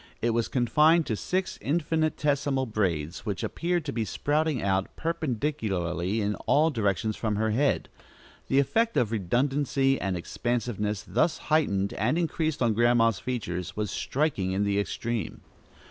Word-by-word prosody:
It 120 - +1
was 115 0 0
confined 150 +6 +3
in - - +1
six 185 - -2
infinitesimal 150 -3 0
braids 90 - -2
which 100 -5 -3
appeared 175 -1 -1
to 140 - -3
be 115 - -1
sprouting 145 - 0
out, 95 -1 +1
perpendicularly, 110 - -1
in 105 0 0
all 155 +3 +4
directions 110 -2 0
from 110 -2 -1
her 110 +1 +1
head. 135 +6 +1 0.6
The 135 - +1
effect 225 - +2
of 120 -5 +2
redundancy 135 +6 +1
and 95 -2 -1
expansiveness 105 0 -2
thus 170 - +1 0.2
heightened 100 -11 +2
and 125 +10 0
increased 160 -3 0
on 115 -2 +3
Grandma's 115 -2 +3
features 90 -9 -4
was 105 -2 -2
striking 130 -11 -1
in 100 +2 +1
the 100 0 +1
extreme. 115 +2 -3
120 Hz, 145 wpm, -27 LUFS, 100-150 Hz, 0.6 s, all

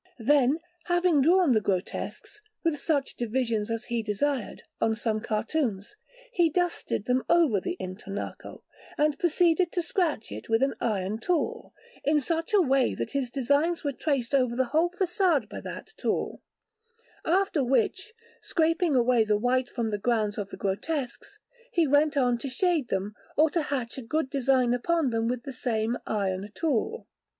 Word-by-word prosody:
Then, 270 +3 +3 0.3
having 350 -4 +3
drawn 345 +1 +4
the 220 -3 +3
grotesques, 195 - -3 0.2
with 325 -4 +1
such 285 -2 0
divisions 230 -2 -1
as 230 0 -2
he 235 -1 -2
desired, 225 +4 -2 0.2
on 225 0 +2
some 220 -1 -1
cartoons, 215 - -2 0.4
he 345 -2 +3
dusted 350 - -1
them 250 +1 +1
over 320 - +4
the 360 - -3
intonaco, 195 +2 -7 0.3
and 300 -1 +1
proceeded 345 0 +3
to 350 - -1
scratch 345 - -1
it - - -8
with 225 +2 +3
an 270 -1 +1
iron 210 -1 -1
tool, 345 +4 -2 0.3
in 300 +1 +3
such 330 - -2
a 410 -3 +5
way 270 -3 +2
that - - -4
his 275 -3 -1
designs 285 +7 +1
were 285 - 0
traced 275 -3 -1
over 250 -3 +2
the 260 +1 +2
whole 330 +3 +3
façade 355 - +1
by - - -7
that 440 - -8
tool; - - -2 0.8
after 360 -3 +2
which, 320 - 0 0.3
scraping 330 -2 +1
away 245 -2 +4
the 210 -1 +2
white 245 +3 +1
from 230 -3 -2
the 205 - -2
grounds 215 -2 0
of 200 -1 -4
the - - -8
grotesques, 245 +7 -3 0.3
he 340 -2 +3
went 290 +1 +3
on 245 -3 +2
to 275 - -4
shade 320 0 +1
them 195 +2 -2 0.2
or 310 +1 +5
to 335 - +1
hatch 265 -4 -3
a - - -6
good 270 +3 -2
design 260 -3 +2
upon 300 +2 +1
them 225 0 0
with 245 0 -2
the 275 - -6
same 230 -2 -1
iron 195 -1 -1
tool. 330 - -1
265 Hz, 165 wpm, -27 LUFS, 230-325 Hz, 0.8 s, a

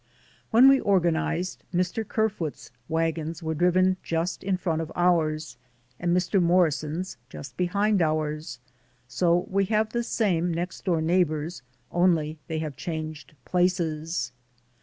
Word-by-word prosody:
When 240 +4 +7
we 270 0 +7
organized, 175 -2 0
Mr. 180 +5 0
Ker 220 0 +2
foot's 165 - -6 0.2
wagons 165 0 -1
were 160 0 -1
driven 185 +3 +3
just 165 +2 -2
in 190 -1 0
front 165 -3 -1
of 160 -1 -6
ours 155 -6 +1 0.4
and 175 0 0
Mr. 180 +2 +2
Morrison's 170 0 +1
just 130 -3 -9
behind 200 +2 +1
ours, 155 -3 -1 0.5
so 170 +7 +2
we 195 +1 +2
have 215 +2 +1
the 235 - 0
same 180 -7 0
next 170 +3 -4
door 170 -4 +1
neighbors, 165 -2 0 0.3
only 165 -3 +2
they 160 - -3
have 155 -3 -4
changed 155 -1 -6
places. 165 -7 0
170 Hz, 135 wpm, -26 LUFS, 155-185 Hz, 0.5 s, When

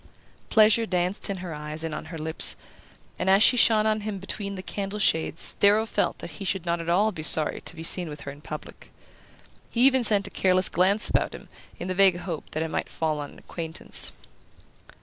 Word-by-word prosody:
Pleasure 220 +1 +4
danced 180 +1 -2
in 195 - -3
her 170 - -6
eyes 150 +1 -7
and 160 -1 -4
on 150 - -6
her 165 - -8
lips, 160 +1 -1 0.6
and 190 - -1
as 195 +3 +5
she - - +5
shone 220 -3 +3
on 215 0 0
him 210 -1 -5
between 200 +1 -6
the 185 - -8
candle 200 +1 -5
shades 160 -5 +1
Darrow 210 +2 +4
felt - - -2
that - - -9
he - - -6
should 190 -2 -3
not 170 0 -1
be - - -5
at - - -5
all 205 +5 +2
sorry 155 0 +5
to - - -4
be 165 - -8
seen 175 0 +2
with 150 -1 -9
her 140 - -7
in 145 +1 -14
public. 150 0 -10 0.8
He 235 - -2
even 265 -2 +4
sent 205 -3 +3
a 200 - -4
careless 185 0 +2
glance 195 +5 +2
about - - -1
him - - -13 0.3
in - - -6
the 185 - -2
vague 190 -1 +4
hope 175 -3 -7
that 155 - -2
it 160 - -4
might - - -4
fall 155 -2 -3
on 145 -1 -7
an - - -17
acquaintance. 165 -2 +2
185 Hz, 220 wpm, -25 LUFS, 160-205 Hz, 0.8 s, as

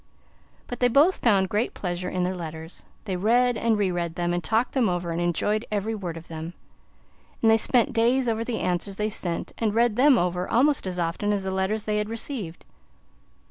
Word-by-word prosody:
But 245 - -6
they 245 - +4
both 285 +10 +4
found 195 -5 +3
great 210 +5 -1
pleasure 180 -1 -3
in 180 -1 -1
their 185 +1 -1
letters. 160 -1 -8 0.2
They 190 -3 -2
read 240 +6 +3
and 225 -1 +1
re 200 -3 +1
read 170 -2 -3
them, 175 0 -1
and 175 0 -2
talked 225 +9 +1
them 250 -7 +2
over 175 -1 -2
and 165 +1 -2
enjoyed 190 +6 0
every 210 +1 -1
word 180 -6 -5
of 165 - -11
them. 160 +1 -7 0.9
And 225 - +6
they 225 - +6
spent 250 +4 +2
days 245 +3 +2
over 225 0 0
the 230 -1 -3
answers 180 +2 -2
they 210 0 0
sent 175 -5 -4
and 220 -2 0
read 235 -1 +2
them 270 0 +6
over 180 -1 -1
almost 275 -2 +2
as 180 -1 -4
often 175 +4 -1
as 200 -2 0
the 190 - -2
letters 190 +3 -1
they 210 -1 0
had 210 0 -2
received. 225 - -5
205 Hz, 210 wpm, -25 LUFS, 175-230 Hz, 0.9 s, And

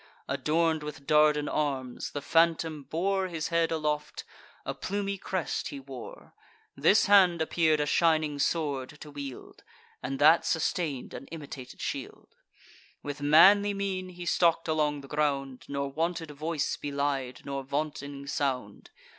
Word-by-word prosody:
Adorn'd 160 0 +1
with 150 -2 -8
Dardan 150 0 +4
arms, 135 -4 -2
the 145 - -6
phantom 165 -2 +2
bore 190 +6 -1
His 165 -3 -4
head 170 -1 +1
aloft; 150 -2 -2 0.4
a - - -2
plumy 200 0 -3
crest 185 -3 -2
he 140 - -6
wore; 135 -2 -10 0.4
This 165 +9 +4
hand 190 -4 +6
appear'd 160 -1 +2
a 150 - +1
shining 155 -2 +2
sword 140 -4 0
to 150 - -9
wield, 140 -3 -8 0.4
And 135 +2 -3
that 155 +4 +6
sustain'd 160 -4 -1
an - - -8
imitated 145 -5 -9
shield. - - -5 0.7
With 145 0 -5
manly 200 +8 +6
mien 190 -2 -3
he 175 -1 -9
stalk'd 170 -1 +2
along 150 -2 0
the 140 - -12
ground, 140 -3 -1
Nor 140 0 -3
wanted 165 +1 -2
voice 155 +1 -2
belied, 140 -3 -2
nor 140 0 -3
vaunting 140 0 -4
sound. 130 -7 -3
150 Hz, 140 wpm, -29 LUFS, 140-165 Hz, 0.7 s, hand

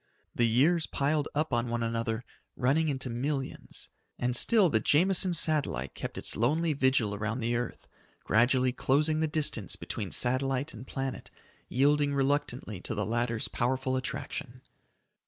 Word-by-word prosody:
The 120 - +2
years 155 +9 +3
piled 145 +1 0
up 155 +2 0
on 120 0 0
one 120 0 -1
another, 115 0 -2 0.3
running 150 +6 +2
into 135 -2 -2
millions, 135 +3 -4 0.3
and 125 0 -1
still 210 - +5
the 110 -9 +2
Jameson 180 - +3
Satellite 145 - 0
kept - - -6
its - - +1
lonely 155 +8 +1
vigil 130 -6 +2
around 110 +4 -3
the 120 0 -1
earth, 120 +1 -4 0.4
gradually 125 +3 +3
closing 150 +5 +1
the 160 - +1
distance 150 - -2
between 100 - -5
satellite 130 - +2
and 120 +3 -10
planet, 135 -1 -5 0.4
yielding 145 +2 +2
reluctantly 135 -7 -1
to 110 - -4
the 105 -1 -1
latter's 115 +1 -1
powerful 130 +2 -1
attraction. 130 0 -5
130 Hz, 145 wpm, -29 LUFS, 120-150 Hz, 0.4 s, still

